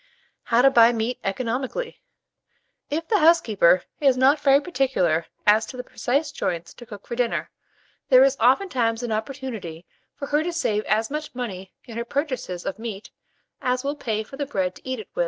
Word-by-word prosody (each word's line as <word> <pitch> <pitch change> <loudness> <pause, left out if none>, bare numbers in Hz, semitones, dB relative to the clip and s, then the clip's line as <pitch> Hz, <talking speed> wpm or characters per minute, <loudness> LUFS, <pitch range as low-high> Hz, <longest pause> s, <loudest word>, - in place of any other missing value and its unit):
HOW 235 +1 +3
TO 270 - +6
BUY 235 -1 +6
MEAT 230 +2 -2
ECONOMICALLY. 255 - -3 0.9
If 320 +3 -3
the 425 - +2
housekeeper 220 - +4 0.2
is 270 -3 +3
not 270 +4 +4
very 275 0 +5
particular 260 - 0 0.2
as 215 +1 +4
to 255 - -9
the 250 - -5
precise 280 +4 -1
joints 170 -2 -3
to 240 - -13
cook 205 -4 -11
for 235 - -5
dinner, 240 -1 -1 0.6
there 255 -1 +8
is 275 0 +3
oftentimes 245 - +2
an 240 - -3
opportunity 215 -7 -5 0.3
for 280 - -6
her 295 +1 +2
to 345 +2 -2
save 215 -11 -1
as 220 +4 0
much 300 -2 -5
money 195 -7 -6
in 230 -1 -9
her - - -1
purchases 255 - -3
of 200 - -4
meat 220 -3 -7 0.5
as 250 0 0
will 285 +1 -2
pay 220 -6 -2
for 270 +5 -12
the 285 -1 -3
bread 190 -8 -1
to 260 - -11
eat 260 - -2
with 220 - -8
it. - - -3
245 Hz, 190 wpm, -24 LUFS, 215-275 Hz, 0.9 s, there